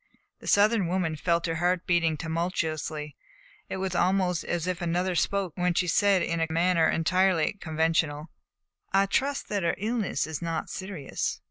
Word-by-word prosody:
The -, -, -12 dB
Southern 205 Hz, -2 st, +4 dB
woman 175 Hz, -3 st, 0 dB
felt 170 Hz, +2 st, 0 dB
her 165 Hz, -1 st, -1 dB
heart 175 Hz, +1 st, +1 dB
beating 165 Hz, -3 st, +2 dB
tumultuously, 160 Hz, -2 st, -3 dB, 0.5 s
and -, -, -3 dB
it -, -, -4 dB
was 190 Hz, -1 st, -2 dB
almost 180 Hz, -1 st, +1 dB
as 175 Hz, -1 st, -2 dB
if 180 Hz, -1 st, -2 dB
another 175 Hz, +2 st, 0 dB
spoke 190 Hz, 0 st, 0 dB
when 180 Hz, -1 st, 0 dB
she 180 Hz, -, +2 dB
said 195 Hz, +1 st, +3 dB
in 170 Hz, 0 st, -1 dB
a 165 Hz, -, +1 dB
manner 170 Hz, 0 st, +3 dB
entirely 185 Hz, +2 st, +2 dB
conventional: 160 Hz, -1 st, 0 dB, 0.6 s
"I 195 Hz, +1 st, +4 dB
trust 275 Hz, +8 st, -1 dB
that 205 Hz, -2 st, -1 dB
her 170 Hz, -1 st, +1 dB
illness 220 Hz, 0 st, -1 dB
is 160 Hz, +1 st, -5 dB
not 165 Hz, -2 st, -3 dB
serious." 185 Hz, -7 st, -4 dB
175 Hz, 165 wpm, -27 LUFS, 165-190 Hz, 0.6 s, Southern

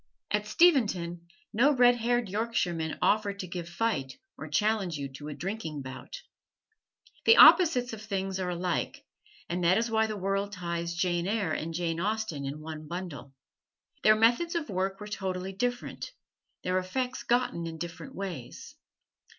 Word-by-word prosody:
At 210 Hz, 0 st, 0 dB
Steventon 200 Hz, -, +2 dB, 0.3 s
no 275 Hz, +7 st, +4 dB
red 245 Hz, -1 st, +6 dB
haired 240 Hz, 0 st, +1 dB
Yorkshiremen 185 Hz, -6 st, -1 dB
offer 205 Hz, -1 st, +2 dB
to 195 Hz, -2 st, -6 dB
give 175 Hz, -1 st, -6 dB
fight 170 Hz, -8 st, -2 dB, 0.2 s
or 155 Hz, -, -8 dB
challenge 190 Hz, +1 st, +1 dB
you 140 Hz, -1 st, -4 dB
to 145 Hz, +3 st, -8 dB
a 150 Hz, -, -5 dB
drinking 175 Hz, -7 st, -4 dB
bout. 310 Hz, -, -9 dB, 1.0 s
The 455 Hz, -, +7 dB
opposites 280 Hz, -10 st, +7 dB
of 220 Hz, -, -7 dB
things 195 Hz, -3 st, -3 dB
are 185 Hz, -1 st, -1 dB
alike, 180 Hz, 0 st, -2 dB, 0.4 s
and 175 Hz, +1 st, -2 dB
that 175 Hz, +2 st, +4 dB
is 230 Hz, +1 st, 0 dB
why 220 Hz, 0 st, +3 dB
the 215 Hz, -1 st, -4 dB
world 195 Hz, +1 st, -1 dB
ties 170 Hz, -2 st, -3 dB
Jane 175 Hz, 0 st, 0 dB
Eyre 205 Hz, -5 st, 0 dB
and 160 Hz, +2 st, -3 dB
Jane 165 Hz, -1 st, -1 dB
Austen 205 Hz, -7 st, -2 dB
in 145 Hz, +3 st, -5 dB
one 155 Hz, -1 st, -7 dB
bundle. 150 Hz, -7 st, -7 dB, 0.7 s
Their 215 Hz, -, +6 dB
methods 240 Hz, +11 st, +3 dB
of 300 Hz, -9 st, -2 dB
work 190 Hz, +1 st, -1 dB
were 210 Hz, -, -7 dB
totally 190 Hz, -2 st, -4 dB
different: 245 Hz, -, -3 dB, 0.5 s
their 185 Hz, 0 st, +1 dB
effects 250 Hz, +7 st, -3 dB
gotten 240 Hz, -8 st, 0 dB
in 165 Hz, -1 st, -6 dB
different 175 Hz, -, -7 dB
ways. 175 Hz, -11 st, -7 dB
190 Hz, 160 wpm, -29 LUFS, 170-225 Hz, 1.0 s, The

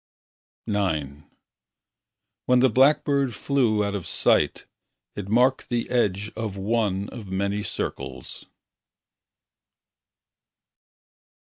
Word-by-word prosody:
IX 75 Hz, -8 st, -2 dB, 1.2 s
When 125 Hz, 0 st, +5 dB
the 130 Hz, -1 st, +4 dB
blackbird 135 Hz, 0 st, +3 dB
flew 110 Hz, -2 st, +1 dB
out 100 Hz, 0 st, -2 dB
of 95 Hz, -5 st, -4 dB
sight, -, -, +2 dB, 0.5 s
It 100 Hz, -1 st, -6 dB
marked 125 Hz, +4 st, +2 dB
the 120 Hz, -1 st, -2 dB
edge 105 Hz, -4 st, 0 dB
Of 110 Hz, -3 st, -4 dB
one 100 Hz, -1 st, 0 dB
of 115 Hz, -5 st, -9 dB
many 100 Hz, +2 st, -1 dB
circles. 100 Hz, -, -6 dB
105 Hz, 90 wpm, -24 LUFS, 100-125 Hz, 1.2 s, When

